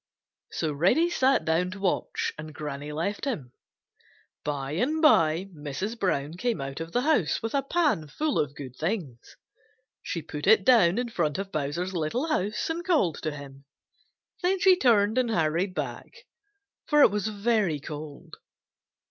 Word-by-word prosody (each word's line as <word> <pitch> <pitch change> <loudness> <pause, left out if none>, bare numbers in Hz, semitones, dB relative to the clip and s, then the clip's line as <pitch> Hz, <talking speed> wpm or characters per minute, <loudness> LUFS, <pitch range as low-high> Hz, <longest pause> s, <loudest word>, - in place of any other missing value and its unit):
So 155 -2 -2
Reddy 245 - +3
sat 270 -3 +2
down 165 +3 +1
to 190 +2 -8
watch, 195 -2 -1
and 155 -1 -9
Granny 150 0 -5
left 170 - -3
him. 150 - -4 0.9
By 140 -2 -3
and 255 - 0
by 175 - +4
Mrs. 155 +10 -5
Brown 150 -6 0
came 235 -3 -1
out 135 +1 -5
of 165 0 -6
the 245 - +1
house 255 - +1
with 225 - -3
a 280 - +2
pan 275 - 0
full 300 - -1
of 145 -1 -1
good 130 -3 -8
things. 160 - -4 0.7
She 165 - -4
put 150 +2 -6
it 210 -2 +6
down 220 -8 +5
in 245 0 -1
front 155 -9 -1
of 195 0 -5
Bowser's 155 +6 -2
little 175 - -1
house 210 -8 -1
and 330 +2 -3
called 305 - +1
to - - -1
him. 140 -2 -10 0.8
Then 375 +1 +1
she 375 0 +6
turned 225 - +3
and 250 -2 +1
hurried 170 0 0
back, 465 - -6 0.6
for 295 -1 +5
it - - +6
was 210 0 -1
very 210 -6 0
cold. 150 0 -9
185 Hz, 165 wpm, -27 LUFS, 150-245 Hz, 0.9 s, it